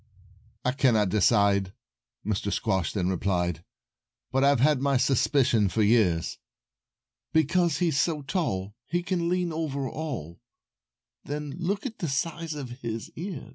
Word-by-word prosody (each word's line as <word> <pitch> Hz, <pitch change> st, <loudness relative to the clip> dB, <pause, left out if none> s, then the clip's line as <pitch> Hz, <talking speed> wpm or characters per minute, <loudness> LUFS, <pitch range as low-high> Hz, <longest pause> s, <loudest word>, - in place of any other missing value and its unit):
"I 125 Hz, -, +3 dB
cannot 115 Hz, -7 st, +3 dB
decide," 100 Hz, -1 st, +3 dB, 0.5 s
Mr. 100 Hz, -1 st, -1 dB
Squash 95 Hz, -7 st, 0 dB
then 95 Hz, -3 st, -1 dB
replied, 90 Hz, -2 st, -1 dB, 0.7 s
"But 135 Hz, +1 st, +2 dB
I've 140 Hz, -2 st, +4 dB
had 145 Hz, +1 st, +3 dB
my 140 Hz, -1 st, +2 dB
suspicions 120 Hz, -, +2 dB
for 110 Hz, -, +2 dB
years; 100 Hz, -7 st, +2 dB, 0.9 s
Because 165 Hz, 0 st, +2 dB
he's 165 Hz, -4 st, +2 dB
so 155 Hz, -4 st, -1 dB
tall 105 Hz, -, -2 dB
He 175 Hz, 0 st, -1 dB
can 175 Hz, -2 st, -1 dB
lean 180 Hz, -2 st, 0 dB
over 140 Hz, -4 st, -2 dB
all; 125 Hz, -, -5 dB, 0.8 s
Then 150 Hz, 0 st, -4 dB
look 190 Hz, +6 st, -2 dB
at 225 Hz, -4 st, -5 dB
the 170 Hz, -, -2 dB
size 160 Hz, +3 st, -2 dB
of 130 Hz, -3 st, -7 dB
his 115 Hz, -1 st, -5 dB
ears." 175 Hz, -3 st, -6 dB
135 Hz, 135 wpm, -27 LUFS, 100-160 Hz, 0.9 s, I've